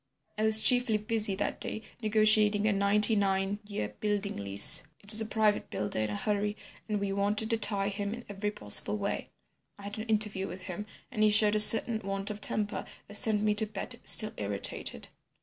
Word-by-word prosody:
I 215 - -5
was 220 0 +8
chiefly 245 -4 +3
busy 215 -1 0
that 205 - -4
day 220 - -6 0.2
negotiating 215 -1 +2
a 210 - +1
ninety 205 +2 +2
nine 195 0 -2
year 200 - -5
building 205 -1 -3
lease. 100 0 +3 0.2
It 205 - +4
was 220 0 +7
a 220 - -4
private 215 -1 -1
builder 105 +1 -3
in 110 -1 -2
a 105 - -5
hurry, 205 - -3 0.3
and 210 -1 -2
we 200 -1 -4
wanted 205 +3 -2
to 230 - 0
tie 200 -2 -2
him 200 0 -6
in 240 - -13
every 205 +1 -5
possible 105 - +2
way. 200 -1 -5 0.5
I 200 - -15
had 205 +2 -8
an 215 - -6
interview 210 -3 -2
with 185 - -10
him, 190 +2 -8 0.2
and 220 -4 -5
he 215 - +3
showed 210 0 +3
a 215 - 0
certain 225 +1 +7
want 195 +1 -5
of 210 0 -10
temper 210 0 0 0.2
that 205 - -13
sent 210 0 0
me 210 0 +1
to 215 +1 +2
bed 215 +3 -6
still 215 -1 +4
irritated. 100 -1 -4
210 Hz, 200 wpm, -28 LUFS, 200-215 Hz, 0.5 s, was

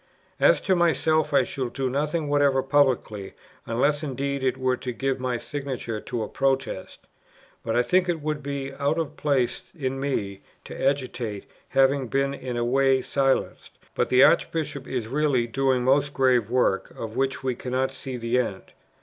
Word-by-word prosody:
"As - - +5
to 190 - +2
myself, 160 -2 +2
I 140 - +4
shall 130 -3 -4
do 135 +2 -2
nothing 150 +4 -1
whatever 140 -2 +3
publicly, 130 -8 +1 0.3
unless 140 +6 +1
indeed 140 -1 -3
it 130 0 +1
were 130 -1 +1
to 125 - -4
give 135 +2 -2
my 125 -1 -1
signature 130 -5 -5
to 115 -2 -3
a - - -4
Protest; 135 -7 -2 0.6
but 115 - -1
I 120 - +4
think 180 +8 +2
it 170 -2 0
would 150 0 -3
be 140 -1 -4
out 145 +3 +1
of 165 -3 -3
place 135 -5 0 0.2
in 135 -2 -2
me 100 -8 -2 0.2
to - - -9
agitate, 125 -6 -2 0.2
having 135 0 +3
been 135 +3 0
in 125 -3 -5
a 120 - 0
way 135 +1 +3
silenced; 135 -1 -1 0.2
but - - 0
the 130 +1 +6
Archbishop 155 -5 +1
is 125 -4 -3
really 135 -2 +1
doing 130 +1 +1
most 140 +2 +2
grave 125 -5 +3
work, 125 -6 +1
of 110 0 -6
which 135 0 -1
we 130 -1 0
cannot 130 +2 -2
see 130 -1 -6
the 120 +1 0
end." 100 -6 -4
135 Hz, 175 wpm, -25 LUFS, 125-140 Hz, 0.6 s, the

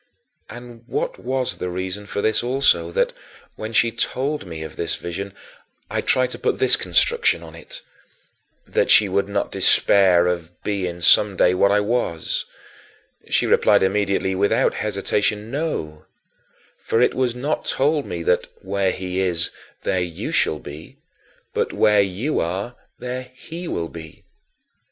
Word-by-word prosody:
20. - - -8
And 120 -1 -14
what - - -3
was 130 0 -2
the 90 - -4
reason 95 +3 -5
for 100 - -3
this 110 0 +2
also, 120 -10 +2
that, 85 - 0 0.4
when 110 +1 -6
she 115 +1 +3
told 135 0 -2
me 80 -2 -6
of 80 - -9
this 85 - -2
vision, 85 +3 -5
and 100 - -19 0.6
I - - 0
tried 130 -1 +1
to - - -3
put - - 0
this 130 - +5
construction 85 -1 +2
on 80 -1 -11
it: 85 - -9 0.8
"that - - 0
she 105 - +7
should 100 +1 0
not 100 - -1
despair 90 -3 +4
of 90 -1 -3
being 90 -4 -3
someday 95 0 +5
what 100 +2 +3
I 105 0 +3
was," 105 -7 -1 0.8
she - - +2
replied - - +4
immediately, 100 -1 +1
without 100 +2 +2
hesitation, 105 +1 -1
"No; 130 - -4 0.8
for 115 - +1
it 125 - +3
was 125 -2 0
not 140 +5 -2
told 145 +1 +1
me 85 -1 -4
that 90 - +1 0.2
'where 95 0 0
he 95 0 -4
is, 85 -3 0 0.3
there 95 - 0
you 85 -2 -4
shall 80 - +1
be' 75 +2 -11 0.6
but - - -1
'where 105 -1 +4
you 100 +10 -1
are, 95 +8 -3 0.2
there 125 +1 -5
he 170 +6 -8
will 85 - -2
be'"? 80 -2 -11
100 Hz, 155 wpm, -22 LUFS, 90-120 Hz, 0.8 s, she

